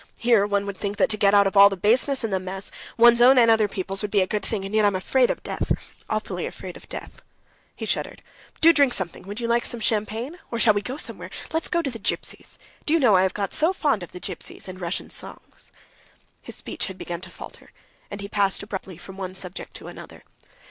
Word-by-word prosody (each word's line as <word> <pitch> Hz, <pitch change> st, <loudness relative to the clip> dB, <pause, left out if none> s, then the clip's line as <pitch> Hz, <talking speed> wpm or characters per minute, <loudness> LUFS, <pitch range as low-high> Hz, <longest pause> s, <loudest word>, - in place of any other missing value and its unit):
"Here 230 Hz, -4 st, +3 dB
one 200 Hz, -1 st, 0 dB
would 200 Hz, -1 st, -5 dB
think 200 Hz, 0 st, -3 dB
that 265 Hz, -, +3 dB
to -, -, +2 dB
get 205 Hz, -1 st, +4 dB
out 200 Hz, 0 st, +6 dB
of 195 Hz, -, -1 dB
all 200 Hz, 0 st, +9 dB
the 195 Hz, -, -4 dB
baseness 250 Hz, +7 st, +2 dB
and 220 Hz, -3 st, -2 dB
the 190 Hz, -, +2 dB
mess, 190 Hz, +1 st, -5 dB, 0.3 s
one's 235 Hz, 0 st, +7 dB
own 255 Hz, +2 st, +7 dB
and 230 Hz, -2 st, +7 dB
other 220 Hz, -2 st, +4 dB
people's, 195 Hz, 0 st, -4 dB
would 210 Hz, -, -2 dB
be 200 Hz, -1 st, +3 dB
a -, -, +3 dB
good 210 Hz, +2 st, -2 dB
thing, 200 Hz, -4 st, -2 dB
and 195 Hz, -, -6 dB
yet 215 Hz, 0 st, +4 dB
I'm 205 Hz, -2 st, +3 dB
afraid 250 Hz, +7 st, +2 dB
of -, -, -3 dB
death, -, -, -3 dB, 0.4 s
awfully -, -, -2 dB
afraid -, -, -8 dB
of -, -, -14 dB
death." -, -, -8 dB, 0.5 s
He -, -, -5 dB
shuddered. -, -, -3 dB, 0.3 s
"But -, -, -23 dB
do 330 Hz, +1 st, +9 dB
drink 280 Hz, -5 st, +4 dB
something. 185 Hz, -3 st, -4 dB
Would 205 Hz, +3 st, -5 dB
you 235 Hz, -, -2 dB
like 235 Hz, 0 st, +2 dB
some 240 Hz, -, -2 dB
champagne? 225 Hz, -, -1 dB
Or 235 Hz, -, -3 dB
shall 225 Hz, -2 st, +5 dB
we 205 Hz, -, 0 dB
go 255 Hz, +6 st, -5 dB
somewhere? -, -, -4 dB, 0.2 s
Let's 320 Hz, -, +1 dB
go 340 Hz, -1 st, 0 dB
to 275 Hz, -, -2 dB
the 230 Hz, -, -8 dB
Gypsies! -, -, -4 dB, 0.3 s
Do 310 Hz, -, +4 dB
you -, -, +4 dB
know 235 Hz, -8 st, +5 dB
I 185 Hz, -, +5 dB
have 190 Hz, -1 st, +1 dB
got 200 Hz, -2 st, -2 dB
so 325 Hz, +4 st, +2 dB
fond 290 Hz, -, +1 dB
of 175 Hz, -, -8 dB
the 180 Hz, -, -9 dB
Gypsies -, -, -7 dB
and 185 Hz, 0 st, -8 dB
Russian 175 Hz, +1 st, -4 dB
songs." -, -, -9 dB, 0.7 s
His -, -, -8 dB
speech -, -, -4 dB
had 190 Hz, -2 st, -8 dB
begun 175 Hz, -1 st, -5 dB
to 185 Hz, -, -9 dB
falter, -, -, -11 dB, 0.4 s
and 200 Hz, 0 st, -7 dB
he 200 Hz, -, -5 dB
passed 200 Hz, -1 st, 0 dB
abruptly 190 Hz, -3 st, -6 dB
from 190 Hz, +2 st, -11 dB
one 185 Hz, -1 st, -5 dB
subject 185 Hz, 0 st, -8 dB
to -, -, -9 dB
another. -, -, -11 dB
205 Hz, 245 wpm, -24 LUFS, 195-235 Hz, 0.7 s, all